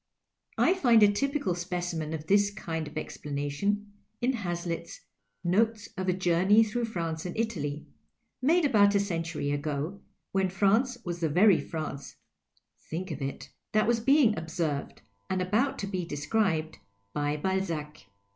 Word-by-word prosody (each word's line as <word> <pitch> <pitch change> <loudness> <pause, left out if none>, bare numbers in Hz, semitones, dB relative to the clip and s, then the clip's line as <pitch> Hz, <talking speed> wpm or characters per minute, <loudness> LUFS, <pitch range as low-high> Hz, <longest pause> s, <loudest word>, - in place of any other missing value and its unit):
I - - +4
find 240 - +5
a 205 - +7
typical 275 - 0
specimen 175 -3 -3
of 160 -1 -4
this 200 +3 +4
kind 165 -6 -4
of - - -11
explana 145 0 -4
tion 205 +6 -1 0.3
in 255 +2 +1
Hazlitt's 175 -5 -4 0.2
" 100 0 -50
Notes 225 0 +1
of 185 -1 -2
a - - +3
Journey 185 +4 +4
through 230 +2 -1
France 165 -7 -3
and 180 +2 -5
Italy,*' 155 -10 -2 0.6
made 325 +5 +4
about 205 -6 +5
a - - +5
century 165 -6 -2
ago, 150 +6 -3 0.3
when 190 -1 +1
France 210 +7 +2
was 175 -1 -3
the 165 -2 0
very 180 +4 +5
France 150 -4 -6 0.7
(think 180 +3 -4
of 155 - -5
it 135 0 -5
!) - - -56
that 215 0 +4
was 235 0 +2
being 255 -2 +4
observed, 160 -3 -3 0.3
and 185 - 0
about 215 +9 +1
to - - -3
be 190 -2 -3
described, 160 - -1 0.3
by 145 0 0
Balzac. 165 - -3
185 Hz, 155 wpm, -29 LUFS, 160-210 Hz, 0.7 s, a